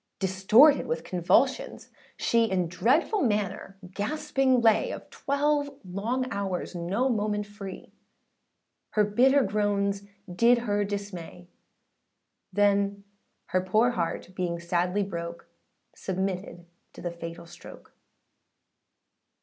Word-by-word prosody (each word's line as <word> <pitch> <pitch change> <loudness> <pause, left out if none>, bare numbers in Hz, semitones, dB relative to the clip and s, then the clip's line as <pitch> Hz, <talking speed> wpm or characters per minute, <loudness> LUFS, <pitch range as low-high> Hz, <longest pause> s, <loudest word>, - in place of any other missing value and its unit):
Distorted 195 +10 +5
with 160 0 -2
convulsions, 185 - +1 0.3
she, 230 -1 +2
In 185 -5 0
dreadful 255 - +1
manner 200 - -1 0.2
gasping 270 +3 +1
lay, 220 -2 +3
Of - - -8
twelve 285 +1 0 0.2
long 220 +8 -2
hours 195 -3 -3
no 185 +9 -1
moment 210 -3 -1
free, 200 -2 -10 1.0
Her 210 - +4
bitter 260 +7 +4
groans 200 -1 0 0.3
did 230 +7 +4
her 205 -1 +1
dismay: 190 -4 -6 1.0
Then 200 0 +2 0.5
her 185 - +1
poor 215 +6 +2
heart 175 -2 -3
being 175 -2 -2
sadly 180 +3 0
broke, 170 -3 -6 0.5
Submitted 185 -2 -4 0.3
to - - -11
the 175 - -2
fatal 170 0 -8
stroke. 175 +1 -13
200 Hz, 105 wpm, -27 LUFS, 180-230 Hz, 1.0 s, Distorted